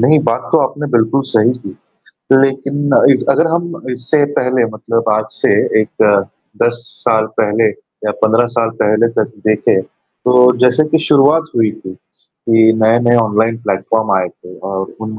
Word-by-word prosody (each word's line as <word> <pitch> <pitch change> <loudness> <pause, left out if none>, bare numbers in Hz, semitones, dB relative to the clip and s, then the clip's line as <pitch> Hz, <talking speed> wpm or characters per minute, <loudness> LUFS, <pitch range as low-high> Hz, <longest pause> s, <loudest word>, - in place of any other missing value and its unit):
नहीं, 150 +6 +4
बात 115 -2 -2
तो 165 - +5
आपने 150 +1 -7
बिल्कुल 120 +4 +1
सही 115 +2 +2
की। 100 -6 -10 0.7
लेकिन 140 +2 -2
अ, - - +4
इ 135 - +5
अगर 140 +4 +2
हम 170 0 -4
इससे 130 +4 0
पहले 125 -1 0
मतलब 115 +1 -3
आज 110 0 0
से - - -1 0.3
एक 110 - -1 0.6
10 120 0 0 0.2
साल 110 -1 +2
पहले 110 +1 +1 0.4
या - - +1
15 115 +2 +3
साल 115 -1 +1
पहले 110 +2 +2
तक - - -1
देखें, 105 -3 +2
तो 125 +5 0
जैसे 125 +4 +3
कि 160 - +3
शुरुआत 150 +3 +3
हुई 110 -2 +2
थी 95 - -10
कि 115 +3 -1
नए-नए 120 +2 +3
ऑनलाइन 110 0 +1
प्लेटफॉर्म 105 +2 -1
आए 90 -1 -2
थे 90 +1 -16
और 95 0 -3
उन 110 -1 -7
115 Hz, 160 wpm, -14 LUFS, 110-130 Hz, 0.7 s, तो